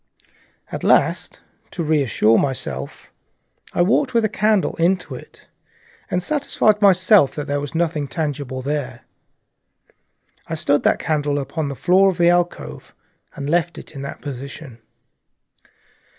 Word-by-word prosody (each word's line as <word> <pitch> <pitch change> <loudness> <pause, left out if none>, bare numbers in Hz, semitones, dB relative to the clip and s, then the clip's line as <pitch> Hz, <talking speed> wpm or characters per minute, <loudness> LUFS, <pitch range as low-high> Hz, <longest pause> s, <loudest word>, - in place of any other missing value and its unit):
And - - -5 0.9
to 170 - -4
reassure 135 -8 +3
myself, 135 -2 -4 0.6
I 175 - +2
walked 255 +7 +1
with 230 -1 +3
a - - 0
candle 210 -1 +1
into 180 +2 +1
it - - -12 0.6
and 180 0 -1
satisfied 220 -7 +1
myself 185 -4 +5
that 150 - -4
there 145 -1 -1
was 145 +3 -7
nothing 160 -3 0
tangible 140 -4 -4
there. 135 -4 -3 1.5
I 160 - -3
stood 145 -2 +1
that - - +2
candle 145 -2 -1
upon 145 +2 -3
the 140 - -5
floor 190 +7 +4
of 185 - -3
the 175 -1 +4
alcove 175 0 -2 0.4
and 140 -1 -5
left 170 +2 0
it - - -10
in 135 - -7
that 140 - -7
position. 140 -2 -8
155 Hz, 135 wpm, -21 LUFS, 140-180 Hz, 1.5 s, myself